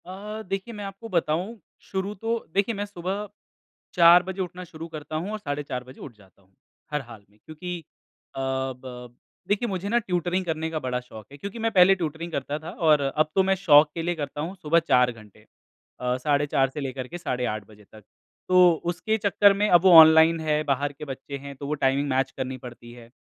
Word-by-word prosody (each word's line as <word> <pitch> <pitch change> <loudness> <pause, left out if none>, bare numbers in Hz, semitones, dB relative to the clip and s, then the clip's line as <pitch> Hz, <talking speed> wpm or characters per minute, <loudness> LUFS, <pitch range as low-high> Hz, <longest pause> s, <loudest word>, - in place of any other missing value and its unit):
अ, 205 +4 -7
देखिए 195 +4 -5
मैं 210 -1 -7
आपको 195 +4 -9
बताऊँ। 180 +5 -1 0.3
शुरू 195 +1 -2
तो 225 +4 -2 0.2
देखिए, 200 +3 +1
मैं 205 +1 -3
सुबह 200 +1 -5 0.7
4 175 0 +7
बजे 190 +1 -5
उठना 180 0 -6
शुरू 165 -2 -9
करता 155 -1 -8
हूँ 175 +6 -3
और 215 - -4
साढ़े 145 -5 -4
4 125 -3 -5
बजे 130 +1 -14
उठ 130 - -9
जाता 100 -1 -23
हूँ। 95 0 -31 0.4
हर 150 -1 -1
हाल 115 -5 -13
में, 105 +1 -29
क्योंकि 175 +3 -6 0.6
अ, - - -5
ब 130 -2 -5 0.3
देखिए 210 +4 0
मुझे 190 +1 -3
ना 235 - +2
ट्यूटरिंग 180 -2 -1
करने 160 -1 -2
का 130 -5 -2
शौक 110 -4 -12
है 140 - -11
क्योंकि 200 +8 -7
मैं 225 0 0
पहले 190 -1 +6
ट्यूटरिंग 165 -1 -5
करता 145 0 -3
था 160 +2 -8 0.2
और 150 -1 +5
अब 145 +3 +1
तो 190 - +4
मैं 195 0 +2
शौक 150 -5 +6
के 165 - -2
लिए 175 +1 -1
करता 145 -1 -5
हूँ, 175 +5 -5
सुबह 165 -2 +2
4 125 -6 +3
घंटे। 110 -4 -17 0.5
अ, 125 0 -1
साढ़े 145 +2 +1
4 135 -1 +2
से 140 - -7
लेकर 130 -1 -5
के 175 - -7
साढ़े 125 -7 -2
8 110 -2 -3
बजे 105 -1 -17
तक। 110 -1 -15 0.5
तो 180 -1 +7 0.2
उसके 220 +5 -1
चक्कर 200 -1 +4
में 205 +1 +1
अब 175 -2 +6
वो 190 - +6
ऑनलाइन 160 +1 +7
है, 155 -1 0
बाहर 140 0 -1
के 150 - -9
बच्चे 140 0 -7
हैं 140 0 -9
तो 140 +1 -7
वो 150 - -1
टाइमिंग 135 +2 +2
मैच 130 0 0
करनी 130 -1 -4
पड़ती 120 -1 -11
है 120 -1 -14
155 Hz, 215 wpm, -25 LUFS, 135-190 Hz, 0.7 s, 4